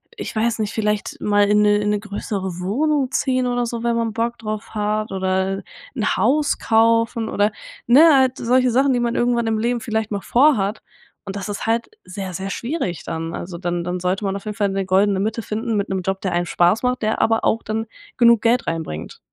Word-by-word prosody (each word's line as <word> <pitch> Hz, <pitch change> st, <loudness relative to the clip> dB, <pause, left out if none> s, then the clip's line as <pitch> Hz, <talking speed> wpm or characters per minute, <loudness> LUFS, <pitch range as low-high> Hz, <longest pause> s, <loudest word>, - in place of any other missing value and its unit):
ich -, -, -6 dB
weiß 230 Hz, +1 st, 0 dB
nicht, 215 Hz, -1 st, -1 dB
vielleicht 210 Hz, -1 st, -2 dB
mal 205 Hz, 0 st, +3 dB
in 210 Hz, 0 st, +4 dB
'ne 205 Hz, 0 st, +4 dB
in 210 Hz, 0 st, -1 dB
'ne 210 Hz, 0 st, +1 dB
größere 200 Hz, -3 st, -5 dB
Wohnung 270 Hz, +7 st, 0 dB
ziehen 255 Hz, -1 st, +1 dB
oder 245 Hz, -1 st, 0 dB
so, 235 Hz, 0 st, -4 dB
wenn 235 Hz, 0 st, +1 dB
man 230 Hz, -1 st, -1 dB
Bock 235 Hz, +1 st, -2 dB
drauf 215 Hz, 0 st, -5 dB
hat, 215 Hz, 0 st, -1 dB
oder 190 Hz, 0 st, -1 dB, 0.3 s
'n 220 Hz, -6 st, 0 dB
Haus 275 Hz, +9 st, +2 dB
kaufen 230 Hz, 0 st, +2 dB
oder, 205 Hz, 0 st, +1 dB, 0.4 s
ne, 295 Hz, +5 st, +7 dB
halt 260 Hz, -1 st, +3 dB
solche 250 Hz, +1 st, +2 dB
Sachen, 265 Hz, +3 st, +3 dB
die 245 Hz, -, +1 dB
man 235 Hz, -1 st, -1 dB
irgendwann 240 Hz, -1 st, +1 dB
im 220 Hz, -1 st, 0 dB
Leben 240 Hz, +1 st, 0 dB
vielleicht 220 Hz, -3 st, -2 dB
mal 200 Hz, -1 st, -2 dB
vorhat. 230 Hz, -6 st, +2 dB, 0.5 s
Und 195 Hz, -, -5 dB
das 200 Hz, 0 st, -5 dB
ist 205 Hz, -, -4 dB
halt 230 Hz, +1 st, 0 dB, 0.2 s
sehr 190 Hz, 0 st, -6 dB
sehr 195 Hz, +2 st, -4 dB
schwierig 235 Hz, -, -3 dB
dann. 165 Hz, 0 st, -4 dB
Also 175 Hz, 0 st, -6 dB
dann 175 Hz, 0 st, -2 dB
dann 180 Hz, +1 st, -3 dB
sollte 185 Hz, +3 st, -1 dB
man 195 Hz, 0 st, -1 dB
auf 200 Hz, -, -7 dB
jeden 210 Hz, -1 st, -4 dB
Fall 205 Hz, -2 st, +1 dB
'ne 195 Hz, 0 st, -2 dB
goldene 195 Hz, +1 st, +2 dB
Mitte 220 Hz, +3 st, -1 dB
finden 225 Hz, +2 st, -3 dB
mit 200 Hz, 0 st, -1 dB
'nem 190 Hz, -1 st, -1 dB
Job, 190 Hz, +1 st, -2 dB
der 185 Hz, -2 st, -2 dB
einem 175 Hz, 0 st, 0 dB
Spaß 175 Hz, +6 st, +2 dB
macht, 250 Hz, 0 st, 0 dB
der 215 Hz, 0 st, 0 dB
aber 225 Hz, 0 st, +2 dB
auch 225 Hz, -, +1 dB
dann 220 Hz, +1 st, -3 dB, 0.3 s
genug 235 Hz, -2 st, +5 dB
Geld 235 Hz, +2 st, +2 dB
reinbringt. 160 Hz, -, -5 dB
215 Hz, 215 wpm, -21 LUFS, 195-235 Hz, 0.5 s, ne